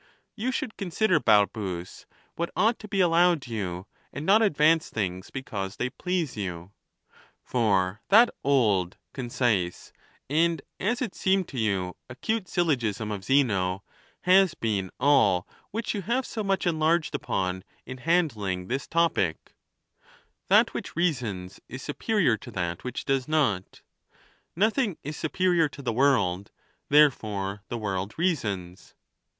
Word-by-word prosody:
You 240 Hz, +4 st, -1 dB
should 250 Hz, -3 st, -4 dB
consider, 190 Hz, -1 st, +1 dB
Balbns, 100 Hz, -6 st, 0 dB, 0.3 s
what 170 Hz, +1 st, -2 dB
ought 220 Hz, +6 st, +2 dB
to 210 Hz, -, -9 dB
be 200 Hz, -2 st, +1 dB
allowed 175 Hz, -2 st, +3 dB
you, 95 Hz, -6 st, -4 dB, 0.3 s
and 145 Hz, -, -6 dB
not 205 Hz, +5 st, +5 dB
advance 160 Hz, -5 st, +3 dB
things 95 Hz, -4 st, -3 dB
because 105 Hz, -7 st, -5 dB
they 125 Hz, +3 st, -2 dB
please 180 Hz, -3 st, -2 dB
you. 90 Hz, -3 st, -5 dB, 0.7 s
For 100 Hz, -4 st, +1 dB
that 230 Hz, +4 st, +7 dB
old, 105 Hz, -10 st, +2 dB, 0.2 s
concise, 120 Hz, -8 st, -1 dB, 0.3 s
and, 160 Hz, +1 st, +1 dB, 0.2 s
as 240 Hz, +6 st, 0 dB
it 245 Hz, -, -4 dB
seemed 190 Hz, -2 st, +1 dB
to 130 Hz, -, -5 dB
you, 95 Hz, -4 st, -1 dB
acute 185 Hz, -, -2 dB
syl 175 Hz, -1 st, +1 dB
logism 110 Hz, -, -1 dB
of 100 Hz, -2 st, -6 dB
Zeno 100 Hz, -7 st, +1 dB, 0.4 s
has 185 Hz, -1 st, +4 dB
been 100 Hz, -4 st, -1 dB
all 105 Hz, -11 st, +3 dB, 0.2 s
which 225 Hz, +2 st, -3 dB
you 205 Hz, -, -3 dB
have 235 Hz, +7 st, -1 dB
so 220 Hz, -, -4 dB
much 195 Hz, -1 st, 0 dB
en 165 Hz, -3 st, 0 dB
larged 160 Hz, 0 st, +2 dB
upon 95 Hz, -1 st, -2 dB, 0.2 s
in 130 Hz, +1 st, -8 dB
handling 110 Hz, -, 0 dB
this 135 Hz, +3 st, -2 dB
topic: 165 Hz, -, 0 dB, 0.4 s
" -, -, -31 dB
That -, -, +5 dB
which -, -, -6 dB
reasons 115 Hz, -, -2 dB
is 130 Hz, +1 st, -7 dB
superior 155 Hz, -, +1 dB
to -, -, -11 dB
that 85 Hz, -2 st, -3 dB
which 125 Hz, 0 st, -5 dB
does 135 Hz, -1 st, 0 dB
not; 130 Hz, -12 st, 0 dB, 0.7 s
nothing 215 Hz, -, +1 dB
is 150 Hz, +2 st, -5 dB
superior 170 Hz, 0 st, +1 dB
to 140 Hz, -, -11 dB
the 120 Hz, -2 st, -1 dB
world; 105 Hz, -8 st, +2 dB, 0.4 s
therefore 105 Hz, -9 st, +2 dB
the 120 Hz, -, -4 dB
world 100 Hz, -2 st, -3 dB
reasons." 105 Hz, -, -2 dB
130 Hz, 140 wpm, -27 LUFS, -, 0.7 s, that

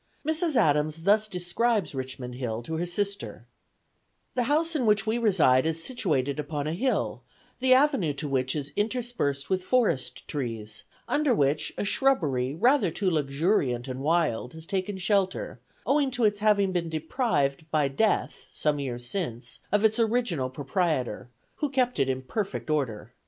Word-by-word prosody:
Mrs. 320 Hz, -1 st, +1 dB
Adams 150 Hz, -, +2 dB
thus 210 Hz, +3 st, +4 dB
describes 190 Hz, +1 st, 0 dB
Richmond 130 Hz, -2 st, -5 dB
Hill 120 Hz, -2 st, -4 dB
to 160 Hz, +6 st, -4 dB
her 175 Hz, +2 st, -2 dB
sister: 200 Hz, +3 st, -3 dB, 0.9 s
"The 245 Hz, -2 st, 0 dB
house 325 Hz, +3 st, +2 dB
in 255 Hz, -6 st, +1 dB
which 210 Hz, -1 st, +3 dB
we 225 Hz, +2 st, 0 dB
reside 160 Hz, -, +4 dB
is 160 Hz, 0 st, 0 dB
situated 150 Hz, -, -1 dB
upon 145 Hz, -1 st, -3 dB
a 155 Hz, -, -1 dB
hill, 255 Hz, +9 st, -1 dB, 0.4 s
the 255 Hz, 0 st, +5 dB
avenue 270 Hz, -, +3 dB
to 140 Hz, +1 st, -4 dB
which 130 Hz, -1 st, 0 dB
is 145 Hz, -1 st, -4 dB
interspersed 215 Hz, -, -1 dB
with 185 Hz, 0 st, +2 dB
forest 180 Hz, -, 0 dB
trees, 115 Hz, -6 st, -5 dB, 0.2 s
under 290 Hz, -5 st, +2 dB
which 145 Hz, -1 st, +1 dB
a -, -, -1 dB
shrubbery 150 Hz, -, +1 dB
rather 240 Hz, -, +3 dB
too 185 Hz, +3 st, -1 dB
luxuriant 140 Hz, -, 0 dB
and 130 Hz, 0 st, -5 dB
wild 150 Hz, -5 st, 0 dB
has 160 Hz, 0 st, -9 dB
taken 190 Hz, +2 st, -2 dB
shelter, 190 Hz, 0 st, 0 dB, 0.3 s
owing 280 Hz, -1 st, +2 dB
to 245 Hz, -2 st, -2 dB
its 205 Hz, -1 st, +3 dB
having 205 Hz, -2 st, +3 dB
been 175 Hz, -2 st, -1 dB
deprived 155 Hz, -, -1 dB
by 150 Hz, -3 st, +2 dB
death, 205 Hz, +11 st, 0 dB
some 150 Hz, -1 st, 0 dB
years 120 Hz, -3 st, -4 dB
since, 125 Hz, -, -4 dB
of 210 Hz, +2 st, +3 dB
its 220 Hz, +2 st, +3 dB
original 220 Hz, -, +1 dB
proprietor, 135 Hz, -, -2 dB, 0.3 s
who 295 Hz, -, -1 dB
kept 255 Hz, -2 st, 0 dB
it 135 Hz, -, +2 dB
in 130 Hz, 0 st, -2 dB
perfect 195 Hz, -, -3 dB
order. 120 Hz, -6 st, -2 dB
165 Hz, 160 wpm, -27 LUFS, 140-220 Hz, 0.9 s, the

